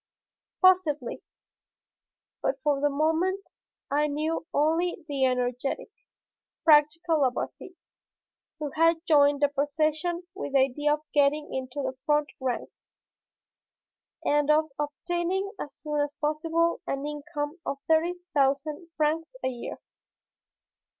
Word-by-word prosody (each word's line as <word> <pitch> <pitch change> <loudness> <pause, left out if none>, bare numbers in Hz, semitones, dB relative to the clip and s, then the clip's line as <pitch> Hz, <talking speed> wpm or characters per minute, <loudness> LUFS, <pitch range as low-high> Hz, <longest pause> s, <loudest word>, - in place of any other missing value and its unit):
Possibly, 320 -9 +3 1.2
but 270 - -1
for 290 -2 +2
the 290 - +3
moment 325 +7 0 0.4
I 295 +1 +2
knew 310 +2 -2
only 325 +4 +1
the 275 -3 +1
energetic, 250 - -1 0.7
practical 310 +1 +4
Labarthe, 270 +7 -2 0.8
who 300 -3 -4
had 330 +2 +2
joined 285 -3 +4
the 290 - +6
procession 310 +4 0
with 380 -7 -6
the - - +5
idea 290 +3 +2
of 300 - -15
getting 295 +1 +2
into 265 +2 -4
the 260 0 -3
front 295 0 +2
rank, 255 -2 -2 1.5
and 295 0 +2
of 310 0 +3
obtaining 350 +6 -2
as 285 -1 -6
soon 300 -1 -3
as 290 0 -2
possible 325 +3 0
an 275 +1 -2
income 295 +2 -4
of 275 - -3
thirty 325 +2 +3 0.2
thousand 290 +4 +1
francs 320 +6 0
a - - +1
year. 245 -2 -6
300 Hz, 115 wpm, -27 LUFS, 285-325 Hz, 1.5 s, the